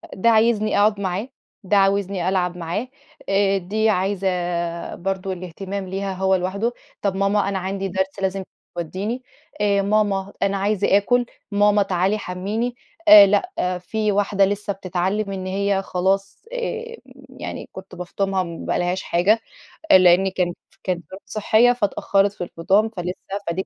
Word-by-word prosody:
ده 230 +5 +3
عايزني 220 -1 +3
أقعد 205 0 +3
معاه. 195 +6 -2 0.3
ده 200 +2 +2
عاوزني 195 -2 +1
ألعب 180 -2 0
معاه. 175 +9 -3 0.4
آآ 195 0 +3
دي 215 +4 0
عايزة 180 -3 -1
برضو 190 +1 -3
الاهتمام 185 +2 -5
ليها 195 +1 -3
هو 190 0 +2
لوحده. 200 +6 -1 0.3
طب 195 -2 0
ماما 200 +1 +1
أنا 195 -1 -1
عندي 195 +1 -3
درس 190 +1 -2
لازم 190 0 -1 0.3
توديني. 195 +9 -4 0.4
آآ، 200 -1 +3
ماما 200 -1 0
أنا 200 0 +1
عايزة 200 0 +2
أكُل. 245 +4 +2 0.3
ماما 205 0 +4
تعالي 190 +2 +1
حمّيني. 210 +7 -3 0.3
آآ 205 -1 +11
لأ 200 - 0
في 215 +3 -1
واحدة 200 -1 +2
لسه 205 0 -2
بتتعلم 195 +2 -2
إن 190 -1 -5
هي 195 +1 0
خلاص 195 - -1
آآ 470 -1 -4 0.3
يعني 260 - -7
كنت 190 -1 -10
بافطُمها 190 +1 -1
ما 170 -1 -7
بقالهاش 180 +2 -1
حاجة، 195 +6 +3 0.5
آآ 190 - +9
لأني 185 +1 +5
كانت 180 -2 -1
ف - - -29
كانت 180 -3 -2
ظروف 190 +1 -10
صحية 220 +4 +3
فاتأخرت 200 -3 +1
في 180 - -5
الفطام 195 +6 +1
فلسه 180 -4 -4 0.4
فدي 170 +3 -1
195 Hz, 150 wpm, -22 LUFS, 185-205 Hz, 0.5 s, آآ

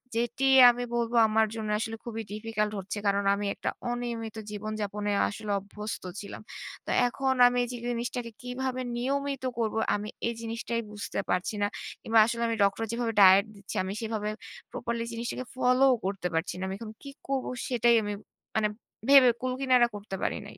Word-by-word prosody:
যেটি 240 +3 0 0.2
আমি 245 0 0
বলবো 235 0 0
আমার 220 0 +3
জন্য 220 -1 -4
আসলে 225 0 -3
খুবই 225 -1 -4
difficult 225 +1 -6 0.3
হচ্ছে 195 +2 -5
কারণ 200 0 +2
আমি 205 +1 -3
একটা - - -2 0.2
অনিয়মিত 235 -2 -4 0.2
জীবনযাপনে 210 -1 -3 0.2
আসলে 210 0 -5
অভ্যস্ত 210 +2 -7 0.2
ছিলাম। 200 - -8 0.4
তো - - -7 0.2
এখন 265 +2 0
আমি 245 0 +1
যে, 245 - -5
জিনিসটাকে 240 0 -3
কিভাবে 255 +1 -3 0.2
নিয়মিত 275 +2 -1 0.2
করব 220 -2 0 0.2
আমি 205 +1 -4 0.2
এই 235 - -1
জিনিসটাই 230 +1 -3
বুঝতে 205 -1 -4
পারছি 180 +4 0
না। 205 - +3 0.3
কিংবা 225 0 +4
আসলে 235 +1 -2
আমি 230 - 0
ডক্টর 200 +3 +1
যেভাবে 235 -1 -1
ডায়েট 195 +1 +8
দিচ্ছে 200 +2 -9
আমি 190 +1 -3
সেভাবে 220 -2 -2 0.4
প্রপারলি 235 0 -3
জিনিসটাকে 235 +2 -4
ফলোও 255 +1 +4
করতে 195 -2 -1
পারছি 165 +2 -1
না। - - -3
আমি 190 - -3
এখন 225 -2 -7
কি 280 - -7 0.2
করব 270 -1 -1 0.2
সেটাই 240 -1 +4
আমি 205 0 -2 0.4
মানে 220 -1 +3 0.4
ভেবে 275 -3 +9
কুলকিনারা 255 -1 +3
করতে 205 -1 -6
পারি - - 0
নাই। - - -11
230 Hz, 170 wpm, -28 LUFS, 210-245 Hz, 0.4 s, ভেবে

